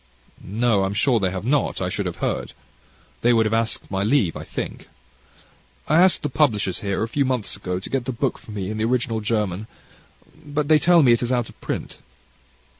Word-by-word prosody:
"No, 110 0 +1
I'm 95 +1 -2
sure 120 +2 +3
they 95 -2 +1
have 95 +2 -5
not 140 +1 +1
I 90 - -1
should 100 +1 -2
have 90 - -4
heard. - - -3 0.7
They 120 +1 +4
would 115 -1 +3
have 110 - 0
asked 115 -2 -1
my 95 0 -1
leave, 105 - +2
I - - -6
think." - - -6 1.0
"I 155 - +3
asked 185 0 +4
the - - +1
publishers 105 - +1
here, 100 +1 -2
a - - -1
few 140 +4 0
months 130 -5 -1
ago, 90 -2 -3
to 95 - -7
get 135 -3 -1
the 130 - -2
book 120 - -2
for - - -17
me 100 -2 -4
in 110 - -4
the 110 - 0
original 115 -2 0
German; 105 -2 -1 0.8
but 145 0 -2
they 155 -1 +6
tell 170 0 +5
me 125 - +6
it 120 - +3
is 120 0 -1
out 120 -3 0
of - - -17
print." - - -5
115 Hz, 215 wpm, -23 LUFS, 100-130 Hz, 1.0 s, they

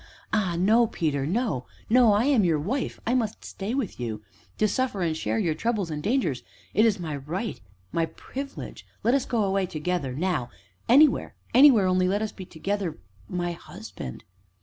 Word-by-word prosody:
ah 190 -6 +1
no, 220 +6 +4
Peter 145 -8 -1
no 195 - -1 0.2
no, 240 -1 +6
I 210 +4 +3
am 270 -7 +4
your 165 -4 +3
wife 225 - -2
I 235 - +1
must 225 -4 -1
stay 205 +5 -4
with 265 - -3
you 110 -3 -4 0.3
to 215 - +3
suffer 230 -5 -1
and 160 -2 0
share 110 -7 -1
your 155 +8 +1
troubles 210 -2 -1
and 150 -1 -3
dangers 200 - 0 0.3
it 220 +2 +5
is 205 -4 +1
my 155 -4 -3
right 175 - -4 0.3
my 165 -1 +1
privilege. 275 +9 -7 0.2
Let 235 - +3
us 275 - +2
go 230 -4 +1
away 195 -1 +1
together, 155 -5 -2
now 155 -6 -1 0.4
anywhere 280 +3 +5 0.2
anywhere, 250 -5 +7
only 185 0 +3
let 205 +3 +1
us 215 - -3
be 185 - -9
together 190 +1 -3 0.3
my 175 -1 -1
husband." 65 - -9
195 Hz, 175 wpm, -26 LUFS, 160-230 Hz, 0.4 s, anywhere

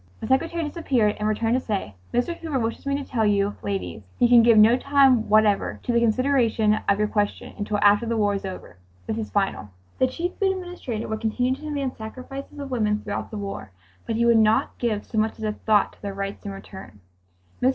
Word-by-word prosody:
The - - -6
secretary 330 +6 0
disappeared 270 -9 0
and 210 - 0
returned 225 +2 0
to 255 - +3
say, 195 - -3 0.2
"Mr. 245 +8 0
Hoover 320 -5 -3
wishes 230 +2 -3
me 280 - +1
to 285 - -4
tell 230 -3 0
you 205 -1 +1
ladies 95 -2 -4 0.2
he 245 - +4
can 240 -1 +7
give 230 -1 +5
no 220 +3 +7
time 270 -3 +3
whatever 215 -1 +3
to - - -1
the 235 - +3
consideration 235 -2 +2
of 200 - +4
your 210 0 +1
question 205 -1 -2
until 210 0 -2
after 205 +3 +4
the 230 0 -1
war 205 -1 +2
is 200 - -3
over. 185 - -8 0.3
This 220 0 -3
is 215 - -4
final." 195 - -1 0.3
The 260 - +4
Chief 345 +7 -3
Food 385 -1 +2
Administrator 355 -12 -5
would 220 0 -4
continue 245 +3 0
to 270 - -8
demand 285 -4 -3
sacrifices 255 +6 -8
of 280 -2 -7
women 215 -4 +1
throughout 205 -1 -4
the 215 - -6
war, 195 - -6 0.3
but 225 - -1
he 235 +1 +2
would 235 -1 +5
not 220 0 +2
give 220 -4 -1
so 220 - -2
much 220 +1 0
as 220 - -8
a 215 - 0
thought 210 -1 +1
to - - -24
their 200 -1 -5
rights 195 +1 -5
in - - -4
return. 190 - -11 0.6
Mr. 255 - +4
220 Hz, 225 wpm, -24 LUFS, 205-255 Hz, 0.6 s, can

